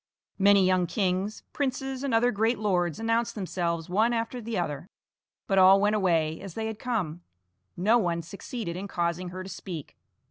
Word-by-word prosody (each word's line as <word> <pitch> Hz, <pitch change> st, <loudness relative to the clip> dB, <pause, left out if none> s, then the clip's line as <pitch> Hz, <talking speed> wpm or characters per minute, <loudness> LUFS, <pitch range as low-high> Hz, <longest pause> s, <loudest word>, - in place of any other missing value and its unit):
Many 200 Hz, -1 st, +6 dB
young 185 Hz, -1 st, +2 dB
kings, 195 Hz, +1 st, -1 dB
princes, 270 Hz, -1 st, -2 dB
and 280 Hz, -, -1 dB
other 235 Hz, +2 st, +3 dB
great 225 Hz, +3 st, +1 dB
lords 180 Hz, -6 st, 0 dB
announced 230 Hz, +1 st, 0 dB
themselves 170 Hz, -4 st, -2 dB
one 220 Hz, +6 st, +2 dB
after 230 Hz, +2 st, -2 dB
the 225 Hz, -1 st, -3 dB
other, 160 Hz, 0 st, -3 dB, 0.6 s
but 195 Hz, -2 st, +2 dB
all 190 Hz, +1 st, +8 dB
went 210 Hz, +1 st, +2 dB
away 165 Hz, -6 st, +1 dB
as 195 Hz, -3 st, -8 dB
they 220 Hz, -, -2 dB
had 220 Hz, -1 st, -4 dB
come; 185 Hz, -10 st, -2 dB, 0.6 s
no 215 Hz, +7 st, +4 dB
one 170 Hz, -4 st, -1 dB
succeeded 200 Hz, +1 st, -6 dB
in 195 Hz, +3 st, -5 dB
causing 175 Hz, -1 st, -2 dB
her 185 Hz, +1 st, -6 dB
to 190 Hz, -, -9 dB
speak. 170 Hz, -7 st, -7 dB
195 Hz, 175 wpm, -27 LUFS, 175-225 Hz, 0.6 s, all